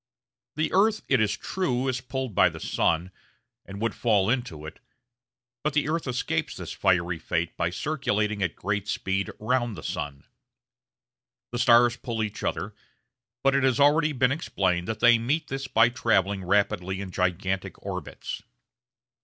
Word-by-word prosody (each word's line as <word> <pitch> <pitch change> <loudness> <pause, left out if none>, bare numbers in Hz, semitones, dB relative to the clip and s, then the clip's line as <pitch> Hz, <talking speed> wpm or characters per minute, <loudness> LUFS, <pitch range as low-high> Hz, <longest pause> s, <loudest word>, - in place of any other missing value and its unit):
The 155 +1 -1
earth, 215 +3 +3
it 135 -5 +3
is 105 -1 +1
true, 135 -9 -1
is 130 -1 -1
pulled 130 -2 -4
by - - +5
the - - -9
sun, 85 +3 0 0.6
and 100 +1 -8
would 115 +1 0
fall 105 -3 +2
into 90 -12 -3
it; 80 - -9 0.8
but 150 -1 0
the 145 0 +1
earth 160 -1 -1
escapes 120 -10 -1
this - - -7
fiery 90 -3 +1
fate 85 +1 -2
by 85 - 0
circulating 105 - -1
at 90 -4 -1
great 100 +1 -2
speed 100 -4 -1
round 120 -2 0
the - - -8
sun. 70 -1 -4 1.3
The 120 - -3
stars 120 0 +5
pull 115 -3 -3
each 105 0 -5
other; 105 +2 -2 0.7
but 135 - +4
it 140 - +3
has 130 -1 +2
already 150 +2 +4
been 130 -2 +2
explained 95 - 0
that 110 - -4
they 120 -1 +6
meet 140 +8 -1
this 135 0 -4
by 115 0 +4
travelling 100 -6 +1
rapidly 95 -1 +1
in 100 -2 -6
gigantic 95 +1 -1
orbits. - - -5
110 Hz, 160 wpm, -26 LUFS, 95-130 Hz, 1.3 s, they